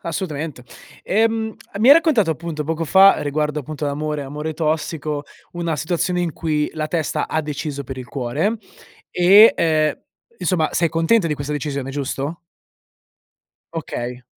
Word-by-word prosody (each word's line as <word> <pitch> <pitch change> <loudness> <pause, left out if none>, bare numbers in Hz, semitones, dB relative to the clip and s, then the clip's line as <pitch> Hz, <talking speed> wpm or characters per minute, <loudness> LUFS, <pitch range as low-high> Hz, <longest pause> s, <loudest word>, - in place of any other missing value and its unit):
Assolutamente. 155 -5 -4 0.4
Ehm, 220 +1 +1 0.2
mi 230 - +4
hai 280 - +11
raccontato 295 - +3
appunto 160 -1 -4
poco 165 +1 -2
fa 195 +4 +6
riguardo 150 +1 -1
appunto 150 +1 -6
l'amore, 150 +1 -2
amore 150 +3 -5
tossico, 155 -2 -2 0.3
una 170 -3 -2
situazione 175 +2 -1
in 170 -3 -1
cui 150 -2 -1
la 155 -1 -3
testa 160 -3 -1
ha 160 - 0
deciso 145 -1 -4
per 130 +1 -7
il 125 - -7
cuore 145 - -1 0.5
e, 195 +5 +7
ehm, 155 -2 +1 0.4
insomma, 165 -4 +1
sei 170 0 +2
contenta 165 +5 +2
di 150 - 0
questa 140 +1 -5
decisione, 140 -2 -3
giusto? 140 +3 -4 1.3
Okay. 125 -6 -5
155 Hz, 140 wpm, -20 LUFS, 145-175 Hz, 1.3 s, hai